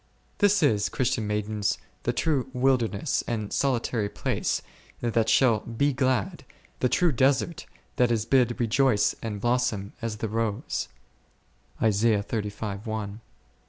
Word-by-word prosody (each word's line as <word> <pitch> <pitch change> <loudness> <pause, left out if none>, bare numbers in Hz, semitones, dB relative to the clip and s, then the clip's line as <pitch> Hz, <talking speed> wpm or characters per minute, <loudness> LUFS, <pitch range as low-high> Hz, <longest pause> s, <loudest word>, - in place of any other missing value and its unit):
This 205 -3 +4
is, 105 -8 +3
Christian 115 -4 0
maidens, 105 -1 -1 0.2
the - - 0
true 140 -5 0
wilderness 125 -1 +1
and 110 -3 -3
solitary 120 -5 0
place - - -1 0.4
that 115 -1 +1
shall 115 -1 +4
be 135 +7 0
glad, 130 -5 0 0.4
the 125 - +2
true 175 +4 +3
desert 135 +5 +1 0.3
that 125 -1 +3
is 110 -2 0
bid 125 -1 +2
rejoice 120 -1 +3
and 105 -3 -4
blossom 120 -3 0
as 115 -2 -3
the 110 - -2
rose?. 110 - -2
120 Hz, 115 wpm, -26 LUFS, 105-130 Hz, 0.4 s, This